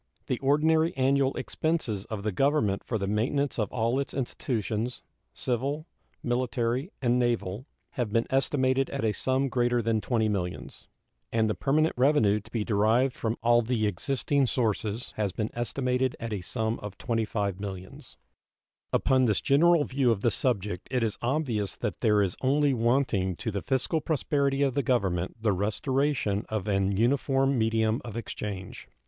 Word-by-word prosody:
The 125 - -2
ordinary 160 +4 +2
annual 135 +1 +2
expenses 130 - -2
of 105 -3 -5
the 105 - 0
Government 110 -3 +1
for 115 - -2
the 100 - -2
maintenance 125 +7 0
of 105 -2 -1
all 120 +3 0
its 140 - -4
institutions, 120 -2 -2 0.3
civil, 135 +5 -2 0.4
military, 120 +3 -1
and 120 0 +3
naval, 120 - -1 0.2
have 120 -5 -2
been 115 +1 +2
estimated 135 0 +2
at 140 -4 -2
a 110 - +3
sum 130 +5 0
greater 120 -1 +1
than 115 -1 0
$20 115 -2 +1
millions, 90 -3 -5 0.4
and 110 -1 +2
the 105 - +1
permanent 155 +6 +1
revenue 120 -7 +4
to 105 - -16
be 115 -3 -2
derived 110 +5 +2
from 115 0 -2
all 120 0 +5
the 115 -2 0
existing 135 +7 0
sources 110 -1 -1
has 105 -4 -1
been 110 -1 -2
estimated 125 +1 -1
at 115 -1 -4
a 100 - -3
sum 110 +5 -2
of 105 -1 -8
$25 105 -4 -1
millions. 95 -2 -8 0.7
Upon 130 -1 +3
this 105 -4 +2
general 165 +3 +4
view 135 -2 +1
of 110 -4 +1
the 120 - +2
subject 105 -7 -1
it 125 -2 0
is 110 -2 -2
obvious 120 -7 -1
that - - -4
there 105 -3 +4
is 95 -3 -1
only 140 +1 +3
wanting 115 -6 +1
to 110 +6 -4
the 100 -1 -3
fiscal 140 +4 0
prosperity 140 -2 0
of 135 -2 +1
the 140 - +1
Government 95 -9 0
the 110 -1 +1
restoration 110 +2 0
of 110 -2 -3
an 100 -1 +1
uniform 135 +3 +2
medium 110 -1 +1
of 115 -2 -7
exchange. 100 -4 -6
120 Hz, 165 wpm, -28 LUFS, 105-135 Hz, 0.7 s, all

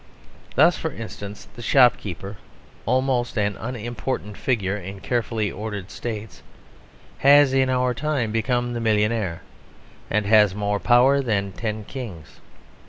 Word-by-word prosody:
Thus, 175 - +5
for 160 - -2
instance, 105 -3 -8
the 120 - -9
shopkeeper, 105 - +2 0.5
almost 125 -1 +1
an 105 -1 +1
unimportant 120 -2 -4
figure 105 -7 -1
in 95 0 -7
carefully 115 -3 -1
ordered 105 -1 -6
states, 110 -2 -6 0.8
has 140 0 +6
in 130 -1 +3
our 125 -1 +1
time 140 -4 -1
become 120 +2 0
the 120 - -3
millionaire, 105 -4 0 0.7
and 105 0 +1
has 105 -2 +5
more 105 0 -1
power 125 +5 +4
than 100 -6 -1
ten 110 +2 -4
kings. 105 - -9
115 Hz, 125 wpm, -23 LUFS, 105-125 Hz, 0.8 s, has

